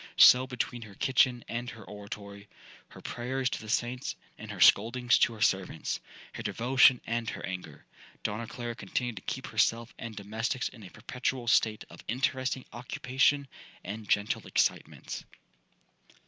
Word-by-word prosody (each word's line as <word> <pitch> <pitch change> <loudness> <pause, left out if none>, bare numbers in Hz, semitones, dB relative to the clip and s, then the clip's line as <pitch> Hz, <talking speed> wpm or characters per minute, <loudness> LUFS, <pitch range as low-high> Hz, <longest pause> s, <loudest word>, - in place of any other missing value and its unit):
So 130 +1 +8
between 125 -1 -3
her 105 -3 -11
kitchen 130 -1 +2
and 120 +1 -3
her 115 -3 -10
oratory,—her 100 0 -11
prayers 130 +1 -2
to - - -3
the 110 - -9
saints, 120 +3 -1 0.2
and - - -10
her - - -6
scoldings 120 +3 +5
to 115 - +4
her 110 - -10
servants,—her 95 -6 -2
devotion 125 +1 +4
and 115 0 -1
her - - -5
anger,—Donna 105 +4 -7
Clara 120 0 -5
continued 120 -1 -3
to - - -6
keep - - -4
herself 115 +1 +1
and 115 -1 -6
domestics 110 +5 -2
in 115 - -14
a 95 - -10
perpetual 125 +3 -3
state 110 -2 +3
of - - -12
interesting 130 +1 -1
occupation 130 +3 +1 0.4
and 105 +2 -6
gentle 100 0 +1
excitement. - - -1
120 Hz, 140 wpm, -30 LUFS, 105-125 Hz, 0.4 s, So